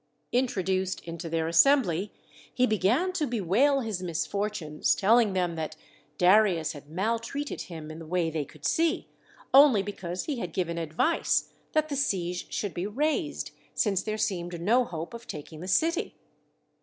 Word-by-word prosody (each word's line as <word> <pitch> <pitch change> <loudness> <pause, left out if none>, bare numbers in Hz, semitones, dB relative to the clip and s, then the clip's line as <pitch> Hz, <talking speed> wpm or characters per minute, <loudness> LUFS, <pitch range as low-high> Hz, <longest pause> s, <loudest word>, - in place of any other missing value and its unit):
Introduced 190 -7 0
into 170 0 -6
their 160 0 0
assembly, 190 - +4 0.4
he 255 - +2
began 245 - +1
to 310 -5 0
bewail 245 - +2
his 215 -6 -3
misfor 200 +4 -1
tunes, 155 -7 0
telling 220 0 +4
them 180 -2 0
that 155 -1 -4 0.4
Darius 180 -4 +4
had 145 -2 -11
maltreated 230 - -2
him 160 -2 -7
in 155 - -8
the 165 - -9
way 170 -1 0
they 155 -2 -1
could 150 +2 -14
see, 330 +2 +1 0.4
only 265 -7 +7
because 185 -3 -5
he 285 -5 -3
had 175 -6 -5
given 170 -3 -1
62 165 -1 -2
THE - - -18
SEVEN 155 - +2
WONDERS 330 - +2
advice - - -26 0.2
that 310 0 +2
the 285 - -2
siege 180 -10 -1
should 205 -3 -2
be 175 +3 -3
raised, 300 +6 -1 0.2
since 195 -4 +1
there 215 +1 -3
seemed 175 -5 -2
no 235 +8 +3
hope 165 0 -6
of 235 0 -9
taking 155 +1 -8
the 180 - -7
city. 330 - +1
190 Hz, 175 wpm, -28 LUFS, 170-245 Hz, 0.4 s, only